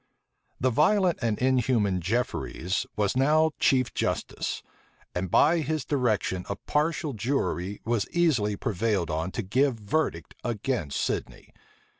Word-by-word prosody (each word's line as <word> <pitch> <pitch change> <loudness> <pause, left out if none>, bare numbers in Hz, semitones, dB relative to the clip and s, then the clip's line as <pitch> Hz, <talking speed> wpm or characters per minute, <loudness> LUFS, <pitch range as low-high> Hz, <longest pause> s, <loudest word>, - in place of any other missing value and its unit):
The 130 0 +2
violent 180 - +3
and 110 -3 0
inhuman 120 -7 +2
Jefferies 95 -3 -1
was 105 0 0
now 155 +4 +4
chief 130 -3 +2
justice; - - -2 0.5
and 90 +1 -2
by 160 - +4
his 155 -1 -2
direction 110 -9 0
a 100 - -1
partial 150 +5 -1
jury 105 -5 -2
was 115 -2 0
easily 140 -12 +2
prevailed 100 -6 -1
on 80 +3 -1
to 115 - -2
give 130 +7 +2
verdict 105 - -2
against 110 - -2
Sidney. - - -3
120 Hz, 125 wpm, -27 LUFS, 100-140 Hz, 0.5 s, now